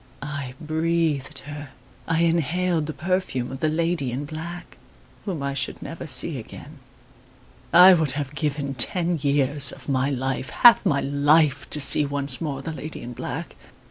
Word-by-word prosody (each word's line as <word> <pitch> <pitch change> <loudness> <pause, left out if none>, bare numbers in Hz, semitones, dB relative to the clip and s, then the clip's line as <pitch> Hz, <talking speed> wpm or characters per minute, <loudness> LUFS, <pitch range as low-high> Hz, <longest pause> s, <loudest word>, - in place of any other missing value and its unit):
I 140 -3 -5
breathed 160 -2 -1
her 145 -1 -8 0.4
I 165 0 +1
inhaled 170 0 +1
the - - -3
perfume 155 -9 -2
of 135 - -7
the 155 - +1
lady 165 -4 -1
in 135 +4 -4
black, 165 +4 -8 0.5
whom 175 -9 -4
I 140 0 -2
should 140 - -5
never 165 0 -7
see 130 +1 +2
again. 145 +6 -12 0.9
I 180 +2 +9
would 160 -6 +1
have 145 -1 -4
given 145 -2 -2
ten 170 +6 +1
years 140 0 +2
of - - -14
my 135 -1 +1
life 130 -1 -3
half 240 - +6
my 140 -5 +1
life 145 0 +2
to 150 - -2
see 150 +1 +5
once 140 -1 -2
more 140 -4 -4
the 165 - -4
lady 155 0 -7
in 120 +1 -7
black! - - -6
145 Hz, 165 wpm, -24 LUFS, 140-165 Hz, 0.9 s, I